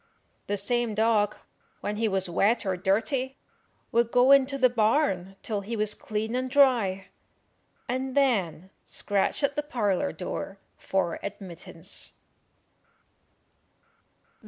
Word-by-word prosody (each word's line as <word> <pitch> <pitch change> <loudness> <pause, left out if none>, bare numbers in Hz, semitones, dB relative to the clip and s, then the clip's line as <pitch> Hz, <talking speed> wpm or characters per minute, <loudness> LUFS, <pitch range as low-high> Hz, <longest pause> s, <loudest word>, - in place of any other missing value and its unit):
The 205 - -1
same 235 +2 0
dog, 215 -1 +2 0.5
when 210 0 -3
he 225 +1 +1
was 190 -2 0
wet 205 +7 +2
or 190 -1 0
dirty, 250 +9 0 0.5
would 235 -1 +2
go 250 +3 +5
into 275 0 +5
the 260 -2 +5
barn 215 -5 +1
till 210 -3 -2
he 220 +4 -4
was 210 -1 0
clean 220 +2 -3
and 255 +1 -1
dry, 240 -9 +3 0.8
and 260 +2 -2
then 190 - +1
scratch 205 +7 -1
at 280 0 +1
the 295 - +1
parlour 210 -10 0
door 195 +2 -5 0.2
for 190 -3 -1
admittance. 190 -4 -7
215 Hz, 120 wpm, -27 LUFS, 195-255 Hz, 0.8 s, go